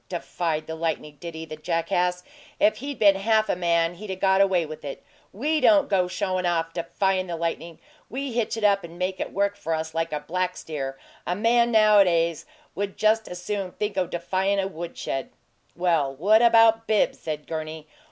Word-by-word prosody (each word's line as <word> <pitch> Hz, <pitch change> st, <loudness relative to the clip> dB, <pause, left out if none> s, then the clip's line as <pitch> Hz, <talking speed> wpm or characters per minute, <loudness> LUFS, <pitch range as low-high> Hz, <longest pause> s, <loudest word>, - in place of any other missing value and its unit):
'Defied 165 Hz, -3 st, -3 dB
the 160 Hz, -, -6 dB
lightning,' 160 Hz, -2 st, -3 dB
did 170 Hz, 0 st, -7 dB
he, 160 Hz, 0 st, -6 dB
the 155 Hz, -1 st, -8 dB
jackass! 180 Hz, +3 st, -1 dB, 0.4 s
If 215 Hz, +1 st, +3 dB
he'd 280 Hz, +3 st, -6 dB
been 200 Hz, -2 st, +5 dB
half 215 Hz, +2 st, +2 dB
a -, -, +2 dB
man 170 Hz, -1 st, +1 dB
he'd 200 Hz, +4 st, -10 dB
'a' 190 Hz, -, -2 dB
got 190 Hz, +1 st, +3 dB
away 185 Hz, -4 st, +3 dB
with 155 Hz, 0 st, -9 dB
it. 140 Hz, -2 st, -7 dB, 0.3 s
WE 300 Hz, +8 st, 0 dB
don't 300 Hz, -3 st, +5 dB
go 185 Hz, -3 st, +2 dB
showin' 185 Hz, 0 st, -2 dB
off 165 Hz, -1 st, -1 dB
defyin' 185 Hz, +2 st, -1 dB
the 170 Hz, -, -3 dB
lightning 165 Hz, 0 st, -4 dB, 0.3 s
we 270 Hz, +1 st, -4 dB
hitch 230 Hz, -1 st, -1 dB
it 225 Hz, -, -4 dB
up 200 Hz, -1 st, +3 dB
and 170 Hz, 0 st, -10 dB
make 185 Hz, +1 st, -2 dB
it -, -, -3 dB
work 200 Hz, +1 st, 0 dB
for 165 Hz, -5 st, -2 dB
us 160 Hz, 0 st, -4 dB
like 165 Hz, 0 st, -1 dB
a 150 Hz, -, -2 dB
black 180 Hz, +4 st, -2 dB
steer! 135 Hz, -4 st, -5 dB, 0.3 s
A 180 Hz, -, 0 dB
man 235 Hz, +3 st, +3 dB
nowadays 190 Hz, -7 st, +4 dB, 0.3 s
would 200 Hz, +2 st, -4 dB
just 220 Hz, +1 st, +2 dB
as 180 Hz, -, -7 dB
soon 195 Hz, -3 st, -3 dB
think 210 Hz, -1 st, -3 dB
o' 185 Hz, -2 st, 0 dB
defyin' 190 Hz, +3 st, -1 dB
a 195 Hz, -1 st, 0 dB
wood 170 Hz, -2 st, -7 dB
shed!" 135 Hz, -, -3 dB, 0.5 s
"Well, 165 Hz, -6 st, +1 dB
what 210 Hz, +10 st, +4 dB
about 225 Hz, -1 st, +5 dB
Bibbs?" 215 Hz, -1 st, +2 dB
said 150 Hz, -2 st, -5 dB
Gurney. 155 Hz, -1 st, -5 dB
180 Hz, 200 wpm, -25 LUFS, 165-205 Hz, 0.5 s, been